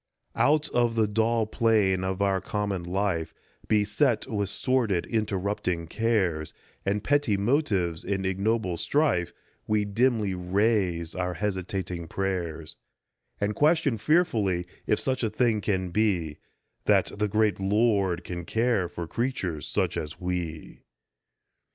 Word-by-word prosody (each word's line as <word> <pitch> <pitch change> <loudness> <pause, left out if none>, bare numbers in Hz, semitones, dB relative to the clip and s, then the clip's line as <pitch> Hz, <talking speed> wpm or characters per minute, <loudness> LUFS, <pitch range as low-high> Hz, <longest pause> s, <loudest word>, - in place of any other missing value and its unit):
Out 150 +1 +3
of 120 -1 +1
the 110 -2 +3
dull 110 +2 +1
plane 105 -4 +2
of 95 +1 -1
our 95 -1 +1
common 100 -3 -2
life, 90 -2 -2 0.3
Beset 110 +4 +2
with 105 -6 -2
sordid, 110 -5 0
interrupting 100 -5 -1
cares, 90 -5 0 0.3
And 100 +1 -1
petty 145 -7 +2
motives 100 - +1
and 95 0 -2
ignoble 95 -1 0
strife, 140 - +1 0.4
We 105 -1 +2
dimly 110 -1 +1
raise 90 -2 0
our 90 -1 -2
hesitating 95 -3 -3
prayers, 85 -4 -3 0.6
And 100 +1 0
question 145 -4 +2
fearfully 110 - +2 0.2
if 105 - +2
such 130 -1 -1
a 115 - +1
thing 110 -1 +1
can 95 -4 -1
be 90 -7 0 0.5
That - - +3
the 105 - +2
great 105 0 +1
Lord 100 -2 +2
can 85 -1 -5
care 110 -2 +1
for 85 -1 -6
creatures 95 - -2
such - - 0
as 75 0 -5
we. 90 -3 -4
100 Hz, 125 wpm, -27 LUFS, 90-115 Hz, 0.6 s, Out